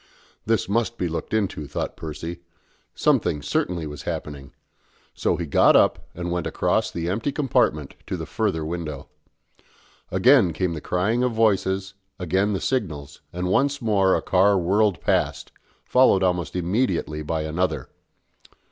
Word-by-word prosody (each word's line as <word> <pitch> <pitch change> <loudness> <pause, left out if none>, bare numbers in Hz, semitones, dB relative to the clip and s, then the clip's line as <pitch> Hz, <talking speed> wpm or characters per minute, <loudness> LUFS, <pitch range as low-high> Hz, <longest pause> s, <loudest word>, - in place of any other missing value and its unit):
This 115 -1 +1
must 115 +3 0
be 90 - -1
looked 85 0 -5
into, 100 -9 -1
thought - - -4
Percy: 80 +2 -6 0.6
something 75 - +1
certainly 85 -3 -1
was 75 -1 -7
happening; 70 -2 -6 0.6
so - - 0
he 85 - -3
got 70 - +4
up - - +3
and 85 0 -4
went 90 -1 -1
across - - 0
the 85 0 -4
empty 110 +10 -1
compartment 95 - 0
to - - -3
the - - -5
further 80 -1 -1
window. 80 -4 -5 1.0
Again 95 - +4
came 90 +2 -1
the 75 - -6
crying 100 +10 0
of 125 -1 +1
voices, 95 -4 +1 0.2
again 95 +3 0
the 95 - -1
signals, 75 - -3
and 90 +1 -4
once 140 +9 +1
more 100 -5 +2
a - - -2
car 95 +2 +3
whirled 95 +1 +2
past, - - 0 0.3
followed 125 -7 +4
almost 90 -2 0
immediately 90 -4 -1
by 80 +1 -2
another. 80 +4 -2
90 Hz, 145 wpm, -23 LUFS, 80-105 Hz, 1.0 s, got